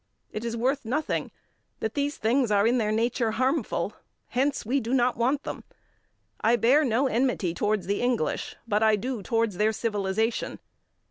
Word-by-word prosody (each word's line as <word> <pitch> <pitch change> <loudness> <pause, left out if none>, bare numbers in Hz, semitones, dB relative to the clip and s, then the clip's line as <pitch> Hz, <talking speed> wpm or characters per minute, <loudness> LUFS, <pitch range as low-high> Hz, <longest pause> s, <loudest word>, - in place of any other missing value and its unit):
It 215 - -5
is 235 0 -3
worth 265 +4 0
nothing 280 +7 -1 0.5
that 220 0 -2
these 285 0 -1
things 240 +2 +2
are, 205 0 +3
in 240 +2 +3
their 215 -2 0
nature, 230 0 0
harmful; 260 +6 0 0.4
hence, 270 +1 0
we 265 +6 +1
do 245 +1 -1
not 245 -1 +2
want 260 +5 +1
them. - - -6 0.8
I 230 +2 +4
bear 255 +6 +4
no 255 0 +2
enmity 240 -8 +1
towards 210 +1 0
the 200 +2 -1
English, 245 -10 -1
but 210 -1 +1
I 220 -1 +5
do 245 +2 -3
towards 225 0 0
their 215 +2 +3
civilization. 220 0 -1
230 Hz, 165 wpm, -27 LUFS, 215-255 Hz, 0.8 s, I